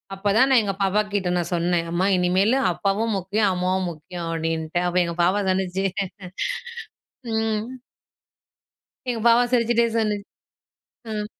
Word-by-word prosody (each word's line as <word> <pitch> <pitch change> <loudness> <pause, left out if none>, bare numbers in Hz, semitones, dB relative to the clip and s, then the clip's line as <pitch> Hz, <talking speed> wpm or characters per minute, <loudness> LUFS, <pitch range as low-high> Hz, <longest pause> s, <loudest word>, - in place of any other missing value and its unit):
அப்பதான் 210 +7 +3
நான் 255 -3 +5
எங்க 195 -1 -1
பாப்பா 195 +2 +2
கிட்ட 190 -3 0
நான் 175 0 -2
சொன்னேன், 170 0 0
"அம்மா! 175 +2 +1
இனிமேலு 190 +8 +2
அப்பாவும் 205 +5 0
முக்கியம், 200 +2 +1
அம்மாவும் 185 +1 0
முக்கியம்." 165 +2 -7
அப்படின்ட்டு. 165 0 -2
அப்ப 175 +1 -1
எங்க 170 0 -4
பாப்பா 195 +4 +2
சொன்னுச்சு 190 0 0 1.5
ம். 220 -1 0 1.4
எங்க 235 -2 -1
பாப்பா 235 +1 +6
சிரிச்சிட்டே 235 -1 +3
சொன்னுச் 210 -3 0 0.9
ம். 210 0 -2
195 Hz, 125 wpm, -23 LUFS, 180-220 Hz, 1.5 s, பாப்பா